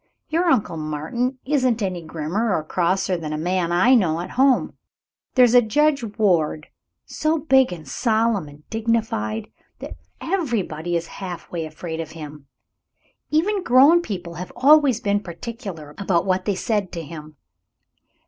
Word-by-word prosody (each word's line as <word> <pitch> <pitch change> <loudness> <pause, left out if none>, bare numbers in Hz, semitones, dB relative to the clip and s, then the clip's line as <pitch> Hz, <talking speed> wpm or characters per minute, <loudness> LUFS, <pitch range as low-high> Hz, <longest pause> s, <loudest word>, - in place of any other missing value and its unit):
Your 335 +3 +1
Uncle 180 - +1
Martin 155 - -3
isn't 255 -5 +1
any 185 -3 -2
grimmer 170 +7 -2
or 155 - -1
crosser 185 +3 0
than 155 -2 -5
a - - -2
man 175 +1 -1
I 190 +9 +4
know 175 -9 +3
at 180 +2 -6
home. 265 0 +2 0.6
There's 250 -2 +6
Judge 275 +4 +3
Ward, 165 -7 +1 0.4
so 315 +1 0
big 265 -5 +3
and 160 -5 -8
solemn 220 - 0
and 145 +1 -16
dignified 220 - -1 0.3
that - - -9 0.2
everybody 205 - -2
is 170 0 -1 0.2
half 180 -3 -7
way 165 -2 -3
afraid 160 +1 -7
of 160 -1 -6
him. 150 -3 -10 0.8
Even 380 +6 +1
grown 295 +3 +6
people 180 - -6
have 180 +1 -7
always 280 -3 +5
been 205 -2 +1
particular 180 - -8
about 190 -4 +1
what 185 -1 0
they 205 - 0
said 205 -1 -1
to 170 - -5
him. 155 -1 -10
190 Hz, 150 wpm, -22 LUFS, 165-245 Hz, 0.8 s, There's